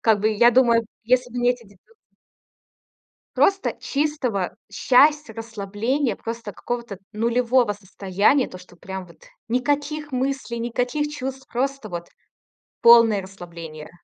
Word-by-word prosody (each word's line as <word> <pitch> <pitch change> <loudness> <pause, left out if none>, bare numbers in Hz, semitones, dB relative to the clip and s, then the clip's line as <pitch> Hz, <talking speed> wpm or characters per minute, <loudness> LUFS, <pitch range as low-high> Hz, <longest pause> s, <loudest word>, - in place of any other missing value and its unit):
как 220 -3 +3
бы 215 - +3
я 235 +3 +5
думаю, 235 -2 +4 0.2
если 250 +1 +2
бы 245 - -5
не 245 0 +3
эти 245 -3 -5
деток 205 - -24 1.4
Просто 390 0 +2
чистого 275 -10 -1 0.2
счастья, 290 -1 +4
расслабления, 225 +4 -2
просто 230 0 -6
какого-то 235 -5 -5
нулевого 235 +1 +2
состояния, 200 +6 +1
то, 185 - -10
что 180 0 -16
прям 190 +1 -7
вот 170 - -19 0.3
никаких 290 +4 -1
мыслей, 260 -2 -2
никаких 250 +5 -1
чувств, 265 -1 -6
просто 270 -2 -2
вот 175 -1 -6 0.7
полное 230 -4 +7
расслабление. 170 -5 -10
235 Hz, 125 wpm, -23 LUFS, 205-260 Hz, 1.4 s, полное